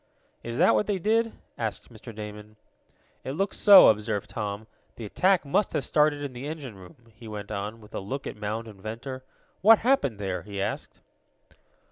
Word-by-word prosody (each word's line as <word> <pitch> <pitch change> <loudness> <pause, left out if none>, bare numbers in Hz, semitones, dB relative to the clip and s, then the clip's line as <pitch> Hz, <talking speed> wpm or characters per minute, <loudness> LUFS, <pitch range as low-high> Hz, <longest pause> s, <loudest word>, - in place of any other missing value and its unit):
"Is 120 0 -5
that 175 +5 +5
what 210 - +1
they 205 -2 0
did?" 225 +5 +1 0.3
asked 115 +1 -4
Mr. 115 +2 -10
Damon. 105 0 -9 0.7
"It 130 - -4
looks 195 +6 -1
so," 200 -2 +9
observed 105 -1 -1
Tom. 105 0 -4 0.3
"The 115 - -7
attack 185 - +2
must 185 +8 +1
have - - 0
started 150 -1 +2
in 140 -2 -5
the 125 +3 -7
engine 150 -6 -6
room," 100 +5 -16
he 115 +1 -13
went 105 -1 -7
on, 105 +2 -5
with 105 - -17
a - - -3
look 130 +9 -5
at - - -5
Mound 105 +2 -4
and 100 -3 -13
Ventor. 130 +5 -6 0.4
"What 220 +4 +8
happened 225 - +2
there?" 95 -2 -3
he 100 -1 -7
asked. 100 +2 -4
115 Hz, 185 wpm, -26 LUFS, 105-150 Hz, 0.7 s, so